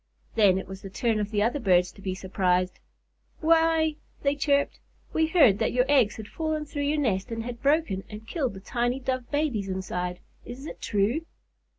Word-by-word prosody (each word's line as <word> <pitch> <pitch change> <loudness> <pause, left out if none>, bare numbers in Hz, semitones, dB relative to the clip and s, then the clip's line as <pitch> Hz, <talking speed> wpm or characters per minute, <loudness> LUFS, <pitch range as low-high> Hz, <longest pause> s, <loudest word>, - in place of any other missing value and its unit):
Then 200 -4 +5
it 190 - -5
was 190 0 -8
the 195 - -8
turn 225 +2 0
of 205 -1 -1
the 205 -1 +1
other 240 +6 +1
birds 180 -5 +3
to 200 - -16
be 190 -1 -3
surprised. 185 -1 0 0.6
"Why," 320 -1 +3 0.3
they 280 0 +2
chirped, 285 0 +1 0.3
"we 320 0 +2
heard 285 - +5
that - - +1
your 250 0 +3
eggs 260 -7 +4
had 215 -2 -8
fallen 315 +1 -2
through 290 -1 -3
your 305 - +1
nest 210 -8 0
and 230 -1 -3
had 235 0 -6
broken 280 -10 +1
and 215 +1 -9
killed 265 - -2
the 190 - -9
tiny 245 +4 -1
Dove 255 -2 -3
babies 280 -10 -1
inside. 180 -1 -3 0.2
Is 255 +4 -9
it - - -8
true?" 210 +9 +1
235 Hz, 195 wpm, -27 LUFS, 195-290 Hz, 0.6 s, Then